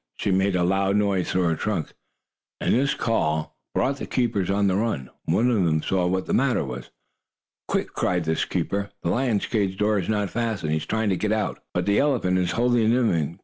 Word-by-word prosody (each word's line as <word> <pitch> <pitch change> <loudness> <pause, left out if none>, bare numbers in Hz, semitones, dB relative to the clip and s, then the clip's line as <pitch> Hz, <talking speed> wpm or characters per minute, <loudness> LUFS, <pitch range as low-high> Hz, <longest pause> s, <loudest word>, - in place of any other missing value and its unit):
She 100 - -1
made 95 +1 +2
a 90 - +2
loud 95 +2 +2
noise 100 -3 +1
through 95 - +1
her 85 -2 +2
trunk, 95 -3 -3 0.7
and - - +1
this 135 +3 +2
call 80 -9 -1 0.2
brought 135 +1 +1
the - - -6
keepers 110 -7 0
on 100 +1 +2
the 95 -2 +2
run. 100 - -2
One 110 +9 +2
of 105 -6 +2
them 80 -2 +1
saw 90 -2 +1
what 95 +1 -1
the - - -2
matter 130 - +2
was. 60 -1 -7 0.8
"Quick!" - - -1
cried 90 -1 0
this 80 0 0
keeper. 100 0 -2
"The 85 - 0
lion's 120 -3 +1
cage 100 -4 -1
door 105 0 +2
is 90 - -4
not 105 -2 0
fastened. 110 -9 -2
He 80 - +2
is 80 - -5
trying 110 -1 0
to 95 - +1
get 105 +3 -1
out, 110 -1 -1
but 90 0 -1
the 100 0 +3
elephant 120 -11 +2
is 90 -1 0
holding 120 -2 +2
him 120 0 +3
in. 80 0 -1
100 Hz, 220 wpm, -24 LUFS, 90-110 Hz, 0.8 s, the